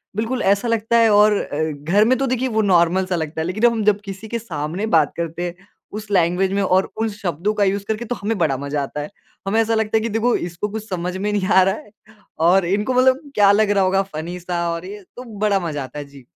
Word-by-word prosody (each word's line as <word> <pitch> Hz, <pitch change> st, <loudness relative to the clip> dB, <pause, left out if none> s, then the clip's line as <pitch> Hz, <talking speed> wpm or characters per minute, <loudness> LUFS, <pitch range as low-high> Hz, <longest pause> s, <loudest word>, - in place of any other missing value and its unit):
बिल्कुल 230 Hz, +4 st, -2 dB
ऐसा 200 Hz, +4 st, 0 dB
लगता 230 Hz, 0 st, +1 dB
है 230 Hz, -1 st, +5 dB
और 210 Hz, 0 st, +5 dB
अ, 150 Hz, +2 st, -3 dB
घर 165 Hz, +9 st, +1 dB
में 255 Hz, +3 st, +3 dB
तो 270 Hz, +2 st, -1 dB
देखिए 255 Hz, +1 st, 0 dB
वो 220 Hz, -, +4 dB
नॉर्मल 175 Hz, +2 st, +3 dB
सा 185 Hz, -1 st, -2 dB
लगता 160 Hz, -1 st, -3 dB
है, 160 Hz, -, -2 dB
लेकिन 210 Hz, +6 st, 0 dB
हम 230 Hz, -2 st, +2 dB
जब 205 Hz, -, -7 dB
किसी 195 Hz, +3 st, -8 dB
के 235 Hz, +2 st, -3 dB
सामने 170 Hz, -1 st, -4 dB
बात 150 Hz, -3 st, +2 dB
करते 170 Hz, 0 st, -4 dB
हैं 180 Hz, +3 st, -11 dB, 0.3 s
उस 215 Hz, -1 st, -8 dB
लैंग्वेज 180 Hz, +1 st, +2 dB
में 200 Hz, -, +1 dB
और 190 Hz, 0 st, +1 dB
उन 225 Hz, -, +1 dB
शब्दों 200 Hz, -2 st, -2 dB
का 205 Hz, -, +3 dB
यूज़ 200 Hz, +1 st, 0 dB
करके 220 Hz, +2 st, -2 dB
तो 245 Hz, +2 st, -3 dB
हमें 210 Hz, +1 st, -1 dB
बड़ा 150 Hz, -6 st, +1 dB
मज़ा 140 Hz, +2 st, -3 dB
आता 150 Hz, +2 st, -5 dB
है। 145 Hz, -, -6 dB, 0.4 s
हमें 215 Hz, +3 st, +2 dB
ऐसा 225 Hz, 0 st, 0 dB
लगता 220 Hz, 0 st, +1 dB
है -, -, 0 dB
कि 230 Hz, -, -2 dB
देखो 235 Hz, +2 st, +2 dB
इसको 175 Hz, +3 st, -3 dB
कुछ 215 Hz, +1 st, -6 dB
समझ 180 Hz, -1 st, -3 dB
में 205 Hz, +2 st, -2 dB
नहीं 200 Hz, -2 st, -1 dB
आ 190 Hz, -1 st, +5 dB
रहा 190 Hz, +1 st, +1 dB
है 210 Hz, -, -13 dB, 0.6 s
और 185 Hz, +1 st, +4 dB
इनको 205 Hz, +7 st, 0 dB
मतलब 260 Hz, +2 st, +3 dB
क्या 200 Hz, -1 st, +6 dB
लग 210 Hz, +1 st, +3 dB
रहा 200 Hz, -1 st, +3 dB
होगा 190 Hz, +1 st, +2 dB
फनी 170 Hz, +3 st, -5 dB
सा 175 Hz, -1 st, -2 dB
और 170 Hz, +2 st, -5 dB
ये 205 Hz, +1 st, -9 dB
तो 250 Hz, -, -8 dB, 0.2 s
बड़ा 205 Hz, -2 st, +3 dB
मज़ा 155 Hz, -6 st, -4 dB
आता 145 Hz, +3 st, -8 dB
है 145 Hz, -, -6 dB
जी। 140 Hz, -2 st, -16 dB
195 Hz, 255 wpm, -20 LUFS, 170-220 Hz, 0.6 s, क्या